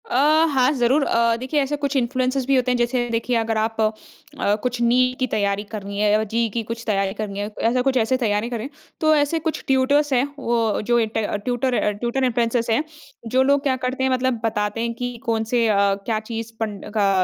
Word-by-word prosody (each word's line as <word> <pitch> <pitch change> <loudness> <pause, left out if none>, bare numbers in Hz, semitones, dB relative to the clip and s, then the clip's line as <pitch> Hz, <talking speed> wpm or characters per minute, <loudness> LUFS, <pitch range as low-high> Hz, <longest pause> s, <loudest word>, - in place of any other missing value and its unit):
अ, - - -2 0.3
हाँ 265 -2 +3
ज़रूर। 265 +2 +2
अ, 230 0 +2
देखिए 260 +4 0
ऐसे 280 +2 -1
कुछ 285 0 -2
इन्फ्लुएंसर्स 255 +1 0
भी 275 +1 +2
होते 255 -1 +2
हैं 250 - +1
जैसे 240 0 0
देखिए 230 +2 -1
अगर 225 -1 -1
आप 225 +1 -1 0.6
अ, 205 - +2
कुछ 250 -1 -2
नीट 250 +2 +3
की 255 - +1
तैयारी 200 -2 0
करनी 200 -2 -5
है 210 0 +3
या 215 +1 +3
जेईई 230 +2 -1
की 230 +3 -2
कुछ 230 +1 -6
तैयारी 195 -2 0
करनी 205 -2 -5
है, 205 +1 -3
ऐसा 245 +2 +2
कुछ 265 0 +1
ऐसे 250 +2 +2
तैयारी 220 -2 0
कर 240 - -3
रहे 220 - -5
हैं, 285 - -9 0.3
तो 310 -1 +4
ऐसे 295 +2 +1
कुछ 320 0 -3
ट्यूटर्स 280 +2 +2
हैं 250 0 +3 0.2
वो 230 -4 0
जो 240 +3 +2 0.2
ट - - +1 0.3
ट्यूटर 250 +1 0
अ 225 - +1
ट्यूटर 235 +5 -2
इन्फ्लुएंसर्स 235 -1 0
हैं, 225 +6 +2 0.4
जो 255 +3 +3
लोग 280 +1 +2
क्या 270 -3 +1
करते 255 +1 -2
हैं 265 - +2
मतलब 255 -2 0
बताते 210 0 -1
हैं 235 0 -1
कि 245 0 -5
कौन-से 230 +1 +1
अ, 215 - +2 0.3
क्या 220 -2 0
चीज़ 225 +1 -6
पढ़ 225 -1 -1
न 205 0 -9
का 205 -2 +3
235 Hz, 225 wpm, -22 LUFS, 220-260 Hz, 0.6 s, तो